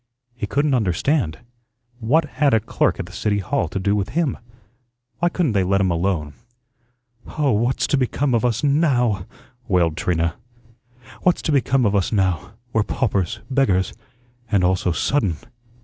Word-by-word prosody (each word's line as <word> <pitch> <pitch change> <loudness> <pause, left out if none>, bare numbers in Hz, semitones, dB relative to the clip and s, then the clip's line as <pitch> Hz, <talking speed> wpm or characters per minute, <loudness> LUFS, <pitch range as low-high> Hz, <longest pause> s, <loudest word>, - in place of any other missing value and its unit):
He 120 - -5
couldn't 145 0 +1
understand. 110 - 0 0.6
What 145 +8 +2
had 140 -3 +2
a - - +4
clerk 105 - 0
at 95 - -3
the 90 - -13
City 105 +2 -1
Hall 90 -2 -1
to 90 - -5
do 100 +2 +1
with 100 -2 -1
him? 165 -7 +1 0.8
Why 175 - +2
couldn't 170 -6 0
they 100 -3 +2
let 95 +2 +2
him 95 -2 +2
alone? 85 -4 -1 1.0
"Oh, 145 -3 +2
what's 120 +4 +1
to 145 - +1
become 130 +1 0
of 115 - +2
us 120 +1 0
NOW?" 125 - +2 0.4
wailed 85 -4 +2
Trina. 85 -1 0 0.8
"What's 180 -1 +2
to - - 0
become 135 -2 +2
of 105 -1 +2
us 95 -3 +1
now? 95 -2 0 0.2
We're 110 - +3
paupers, 100 -4 -1
beggars 130 -9 +1 0.6
and 100 -3 +3
all 90 +1 +3
so 90 -1 -1
sudden." 100 - 0
105 Hz, 165 wpm, -21 LUFS, 95-135 Hz, 1.0 s, a